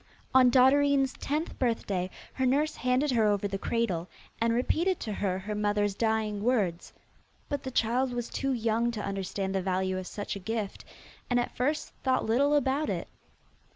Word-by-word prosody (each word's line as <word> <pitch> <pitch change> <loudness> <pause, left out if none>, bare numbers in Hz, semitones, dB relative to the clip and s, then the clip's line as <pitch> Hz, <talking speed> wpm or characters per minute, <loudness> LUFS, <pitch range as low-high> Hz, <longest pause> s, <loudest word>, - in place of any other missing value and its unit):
On 255 -1 +7
Dotterine's 270 +2 +4
tenth 305 +4 -3
birthday 200 -7 0 0.2
her 260 - 0
nurse 295 +4 +1
handed 255 +4 +1
her 225 -3 +3
over 205 -1 +1
the 195 -1 -4
cradle, 195 -7 -1 0.3
and 230 0 +3
repeated 325 +10 +1
to 215 - -3
her 195 -2 -1
her 200 +3 -5
mother's 205 -1 +1
dying 220 -1 0
words; 205 -8 0 0.6
but 285 -1 -2
the 260 - -5
child 245 +2 +1
was 240 -1 -3
too 275 -1 -2
young 230 -1 +1
to 210 -2 -4
understand 195 0 -3
the 190 - 0
value 185 0 -1
of 185 - -7
such 205 -1 -5
a - - -5
gift, 215 +1 -4 0.4
and 245 -1 +3
at 240 - -3
first 295 +5 0
thought 260 -1 +2
little 280 +6 +3
about 285 +1 +1
it. - - -3
230 Hz, 175 wpm, -29 LUFS, 205-260 Hz, 0.6 s, On